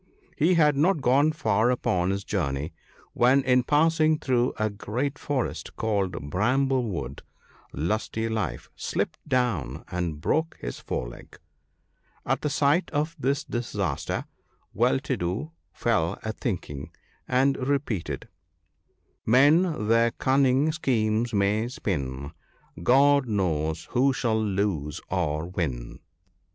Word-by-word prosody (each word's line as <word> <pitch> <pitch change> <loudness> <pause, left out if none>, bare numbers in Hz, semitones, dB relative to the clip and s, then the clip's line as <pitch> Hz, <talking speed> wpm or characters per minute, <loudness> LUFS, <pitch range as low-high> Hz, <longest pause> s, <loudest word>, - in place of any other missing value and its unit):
He 175 +4 +3
had 150 -3 +4
not 160 +5 +3
gone 140 +4 +3
far 120 -7 +1
upon 95 -7 +1
his 100 +1 -1
journey 75 -8 -2 0.4
when 130 +3 +4
in 125 -1 +4
passing 155 +3 +3
through 125 -3 +1
a 110 - +1
great 120 +8 -3
forest 140 -4 -3
called 95 -9 -2
Bramble 130 +5 +2
wood, 70 - -5 0.5
Lusty 110 +8 -2
life 110 -1 -3
slipped - - -2
down 125 - 0
and 85 -4 -2
broke 160 - 0
his - - -6
foreleg. - - -6 0.9
At 150 - 0
sight 145 +5 +2
of 155 +2 -1
this 140 +1 0
disaster 120 0 -3 0.5
Well 65 - +3
to - - -1
do 95 - -3 0.2
fell 100 -6 0
a 110 - -3
thinking, 75 - -4 0.4
and 135 +2 +3
repeated, 130 - -2 0.3
— 75 -3 -46
" - - -45
Men 145 - +4
their 115 +1 +4
cunning 135 +4 +2
schemes 115 -7 0
may 105 +2 +1
spin 70 - -3 0.3
— - - -16
God 140 +5 +4
knows 85 -6 -1
who 135 +2 +3
shall 110 -4 0
lose 95 -7 -1
or 80 -4 0
win." 75 -10 -4
115 Hz, 125 wpm, -26 LUFS, 90-140 Hz, 0.9 s, had